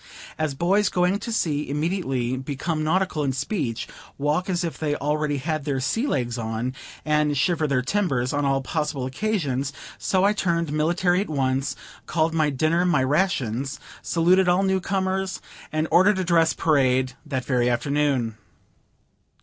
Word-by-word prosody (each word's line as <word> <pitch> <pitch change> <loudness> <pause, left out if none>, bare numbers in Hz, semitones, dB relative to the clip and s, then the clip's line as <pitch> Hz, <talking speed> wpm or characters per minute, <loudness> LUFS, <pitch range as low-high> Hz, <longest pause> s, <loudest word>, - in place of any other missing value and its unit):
As 155 -3 -1
boys 190 +7 +2
going 180 +2 +1
to 230 - -5
sea 150 -10 -1
immediately 140 -5 -1
become 145 +4 -3
nautical 160 -1 +1
in 135 -2 0
speech, 135 - -2 0.3
walk 150 +6 0
as 175 -1 0
if 165 -7 -4
they 150 -2 0
already 150 0 -1
had 155 +2 -2
their 140 -2 -1
"sea 225 - 0
legs" 120 - -1
on, 115 +3 -3 0.3
and 150 -1 +2
shiver 155 +2 +1
their 130 -3 +1
timbers 135 -7 0
on 145 0 0
all 135 -1 +1
possible 150 -2 -2
occasions, 140 -4 -1 0.3
so 185 -1 +1
I 205 +1 +4
turned 170 -5 0
military 175 +4 +2
at 205 - -4
once, 135 -1 0 0.3
called 160 0 +1
my 155 -2 +2
dinner 155 +5 +1
my 175 -7 +2
rations, 135 - 0 0.2
saluted 180 +2 +3
all 180 +2 +3
new 190 -1 +2
comers, 190 0 -1 0.3
and 155 +1 0
ordered 190 +3 +5
a 185 - 0
dress 165 -2 +3
parade 130 -4 +2
that 130 -5 -3
very 125 -2 +2
afternoon. 130 -3 0
150 Hz, 160 wpm, -24 LUFS, 135-180 Hz, 0.3 s, ordered